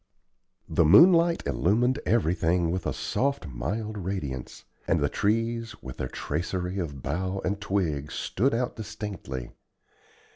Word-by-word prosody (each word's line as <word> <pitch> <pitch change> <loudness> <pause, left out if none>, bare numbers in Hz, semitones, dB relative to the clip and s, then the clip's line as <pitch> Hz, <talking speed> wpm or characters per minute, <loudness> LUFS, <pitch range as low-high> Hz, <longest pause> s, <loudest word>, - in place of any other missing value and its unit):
The - - +3
moonlight 170 - +6
illumined 120 - +2
everything 85 -5 +2
with 90 -1 -2
a - - +1
soft, 140 -4 -1
mild 100 - -4
radiance; 75 -10 -5 0.2
and - - +3
the - - +1
trees, 115 +2 0
with 65 -2 -8
their 65 - -2
tracery 90 +9 -3
of 70 -7 -5
bough 95 +6 -2
and 100 +3 -1
twig, 85 -8 -1
stood 120 +5 0
out 125 +1 -1
distinctly. 105 - -6
95 Hz, 125 wpm, -27 LUFS, 80-115 Hz, 0.2 s, moonlight